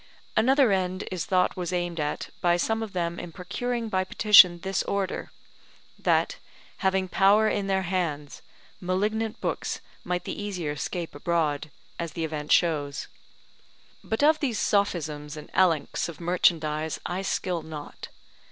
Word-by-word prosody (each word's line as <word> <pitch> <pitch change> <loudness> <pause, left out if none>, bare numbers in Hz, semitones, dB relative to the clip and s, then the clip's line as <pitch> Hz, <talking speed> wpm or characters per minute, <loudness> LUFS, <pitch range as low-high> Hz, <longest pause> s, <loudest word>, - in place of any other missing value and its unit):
Another 260 +1 +4
end 185 0 -1
is 185 -3 -2
thought 185 -2 +2
was 180 -1 -3
aimed 175 -2 -2
at 150 0 -3
by 175 0 +3
some 225 +5 0
of 220 -3 -5
them 170 -1 -2
in 175 - -7
procuring 235 +7 -3
by 190 -3 0
petition 185 -3 +6
this 190 0 -1
Order, 195 -2 -2 0.7
that, - - +1 0.4
having 190 -1 +1
power 200 +4 +4
in 200 -2 0
their 190 -1 +1
hands, 165 -6 -2 0.4
malignant 210 +5 -1
books - - -2 0.2
might 180 0 -2
the - - -5
easier 180 -8 -3
scape 170 +3 -4
abroad, 155 -1 -1 0.3
as 170 -2 -4
the 165 - -3
event 150 -1 -5
shows. 145 -5 +1 0.9
But 220 +5 -1
of 310 +1 +5
these 255 -7 -1
sophisms 155 -8 0
and 150 - -10
elenchs 170 -4 +2
of 170 - -9
merchandise 160 -3 +1
I 180 +2 -2
skill 180 -3 -1
not. 155 -2 -8
180 Hz, 145 wpm, -26 LUFS, 160-200 Hz, 0.9 s, petition